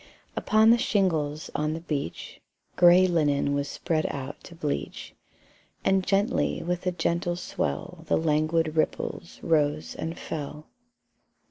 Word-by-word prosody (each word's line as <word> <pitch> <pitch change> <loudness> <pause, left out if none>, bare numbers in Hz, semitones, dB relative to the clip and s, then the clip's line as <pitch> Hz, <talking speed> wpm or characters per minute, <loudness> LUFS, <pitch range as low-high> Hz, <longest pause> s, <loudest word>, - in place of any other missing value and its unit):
Upon 220 +1 +4
the 235 - +5
shingles 160 -9 0
on 150 +1 0
the 160 - -4
beach 150 - -5 0.3
Grey 180 +1 +7
linen 145 -5 +2
was 140 0 -1
spread 155 +1 -1
out 140 +1 -6
to 170 - -11
bleach, 150 -3 -4 0.7
And 190 -1 +3
gently 200 +6 +1
with 180 +1 -2
a - - +3
gentle 175 0 -1
swell 180 -1 -4
The - - +3
languid 155 0 +1
ripples 160 +1 -2
rose 155 -2 +1
and 165 +1 -5
fell. 150 0 -6
165 Hz, 130 wpm, -27 LUFS, 150-180 Hz, 0.7 s, Grey